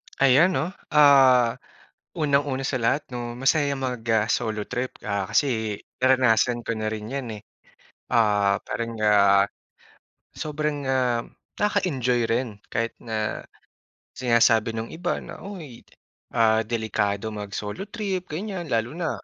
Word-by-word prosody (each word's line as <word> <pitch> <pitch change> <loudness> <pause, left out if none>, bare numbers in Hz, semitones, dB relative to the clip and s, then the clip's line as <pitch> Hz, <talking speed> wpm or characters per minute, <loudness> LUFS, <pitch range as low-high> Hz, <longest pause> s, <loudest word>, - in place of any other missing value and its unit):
Ayan, 140 +7 +4
'no, 175 - -1 0.2
ah, 135 -5 +6 0.6
unang-una 140 -3 +1
sa 130 -1 -1
lahat, 130 +6 +1
'no, 120 -1 -5
masaya 140 +2 +2
mag, 130 -3 -3
ah, 110 -2 +3
solo 110 -3 -1
trip, 125 +1 -4
ah, 100 -2 -2
kasi 110 -7 0 0.2
naranasan 125 -2 +3
ko 115 - -2
na 110 -1 -2
rin 110 +2 -5
yan 135 -3 -3
eh. - - -17 0.7
Ah, 105 -3 +3
parang, 115 0 -3
ah, 100 -2 +5 0.9
sobrang, 150 -1 -3
ah, 125 -3 +1 0.4
nakaka-enjoy 145 - +1
rin 120 +2 0 0.2
kahit 115 +1 -1
na 110 -2 -4 0.7
sinasabi 115 -2 +3
nung 115 +1 -4
iba 175 +2 -2
na, - - -10
"uy, 170 - -9 0.5
ah, 110 -2 +4
delikado 110 -2 -1
mag-solo 105 - -5
trip," 195 -5 -3
ganiyan, 180 +2 -5
lalo 115 -2 0
na 165 0 -2
120 Hz, 130 wpm, -24 LUFS, 110-145 Hz, 0.9 s, ah